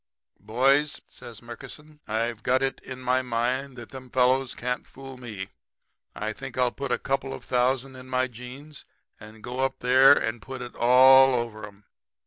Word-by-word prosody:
"'Boys,' 135 +7 +2
says 115 -1 -10
Murkison, 150 +6 -11
'I've 115 +1 -2
got 130 +3 +1
it 135 - -1
in 130 0 -9
my 130 +1 +1
mind 125 +2 -2
that 120 -1 -10
them 130 -2 -10
fellows 130 +1 +2
can't 125 +1 -3
fool 135 0 -11
me. 110 -7 -7 0.7
I 110 0 -3
think 135 +2 -9
I'll 125 -1 +2
put 140 - -5
a - - +2
couple 135 0 -2
of - - -12
thousand 130 +1 0
in 130 0 -12
my 130 0 +1
jeans 130 +5 -11 0.4
and 110 0 -13
go 125 +1 -6
up 135 0 0
there 130 +3 +7
and 115 -4 -2
put 130 +2 -7
it 120 - -9
all 130 +2 +7
over 110 -3 -4
'em. 105 0 -18
125 Hz, 175 wpm, -26 LUFS, 120-135 Hz, 0.7 s, there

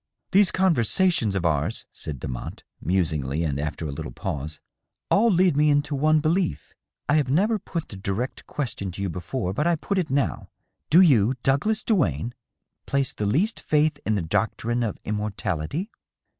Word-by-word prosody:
" - - -54
These 195 -1 +5
conversations 170 - +2
of 90 -3 -1
ours," 80 +5 +1
said 70 -4 -6
Demotte, 60 0 -6 0.2
musingly 80 -5 0
and 70 -3 -1
after 80 +2 -3
a - - -4
little 70 - -6
pause, 75 +5 -4 0.3
" - - -59
all 230 +3 +5
lead 180 -5 +3
me 150 +1 +4
into 145 0 +1
one 155 +3 +3
belief. 170 +3 -1 0.3
I 145 - +4
have 145 -4 +1
never 205 - +2
put 170 -4 -5
the 100 - -8
direct 100 +7 -3
question 115 -9 -3
to 100 - -6
you 95 - -1
before, 90 +3 -3
but 150 +10 0
I 175 - +3
put 195 +5 -1
it 170 -4 -2
now. 135 0 -1 0.4
Do 170 +5 +7
you, 130 - +5
Douglas 205 - +1
Duane, 120 - 0 0.5
place 140 -2 0
the 105 - -2
least 185 - +1
faith 150 -1 +1
in 110 - +1
the 95 - -1
doctrine 110 +6 -1
of 115 -3 -2
immortality 105 - -3
125 Hz, 175 wpm, -25 LUFS, -, 0.5 s, Do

